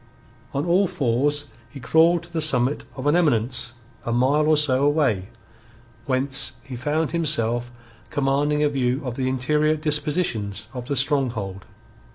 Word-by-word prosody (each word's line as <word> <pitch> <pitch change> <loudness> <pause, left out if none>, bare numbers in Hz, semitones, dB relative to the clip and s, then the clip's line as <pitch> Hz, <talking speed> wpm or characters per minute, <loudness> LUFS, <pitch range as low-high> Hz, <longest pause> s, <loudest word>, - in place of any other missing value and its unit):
On 140 +3 -2
all 185 +3 +3
fours 145 +2 0 0.2
he 135 - -10
crawled 165 +6 +3
to 170 0 -16
the 160 - 0
summit 135 -2 +2
of 130 0 -6
an 145 +2 +3
eminence 120 -7 +2 0.3
a 120 - -3
mile 135 +6 +2
or 155 -1 +4
so 140 -3 +2
away, 140 -10 +1 0.8
whence 135 +1 -1
he 135 -3 -8
found 150 +5 -1
himself 120 -8 0 0.4
commanding 145 +1 +1
a 150 - +3
view 130 -1 -1
of 125 - -3
the 130 +1 -1
interior 150 +4 +1
dispositions 150 - -1
of 125 -2 -6
the 140 - -1
stronghold. 120 -8 -1
140 Hz, 150 wpm, -23 LUFS, 125-150 Hz, 0.8 s, or